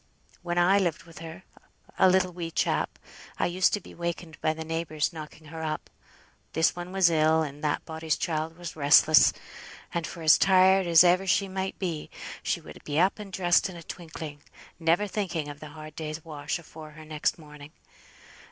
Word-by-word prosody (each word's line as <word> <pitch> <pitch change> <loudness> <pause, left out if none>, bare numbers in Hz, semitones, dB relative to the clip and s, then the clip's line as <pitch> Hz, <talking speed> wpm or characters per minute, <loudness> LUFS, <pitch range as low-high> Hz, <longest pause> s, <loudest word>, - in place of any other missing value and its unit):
When 175 0 -3
I 185 +3 +5
lived 170 -4 -1
with 165 -1 -14
her, 165 +3 -9 0.6
a 190 - +7
little 185 -1 +2
wee 170 -1 -5
chap, - - -1 0.4
I - - +1
used 180 +1 +2
to - - -4
be - - -14
wakened 170 -1 -5
by 155 - +2
the 160 0 -6
neighbours 165 0 -2
knocking 155 -1 -10
her 160 +1 -7
up; 155 -1 -4 0.6
this 160 +1 +2
one 175 0 -7
was 190 -3 +4
ill, 160 0 +3
or 150 - -4
that 150 -1 -1
body's 160 -1 -2
child 160 0 -2
was 175 -2 -7
restless; 150 +1 +6 0.6
and, 170 -2 -2
for 165 - -8
as 155 - +6
tired 190 0 +5
as 170 0 +7
ever 180 +2 +3
she 195 +2 +2
might 190 0 -4
be, 170 -5 -4 0.3
she - - -1
would - - -13
be 150 +1 -1
up 190 +4 +2
and 205 -2 -8
dressed 175 0 +2
in 185 - -9
a 170 - -9
twinkling, 160 -4 -8 0.4
never 165 +5 +2
thinking 180 -7 -3
of 145 0 -9
the 155 - -9
hard 155 0 -11
day's 155 0 -6
wash 150 -2 -4
afore 155 -2 -12
her 155 0 -12
next 155 -1 -1
morning. 150 -2 -12
165 Hz, 190 wpm, -27 LUFS, 155-180 Hz, 0.6 s, a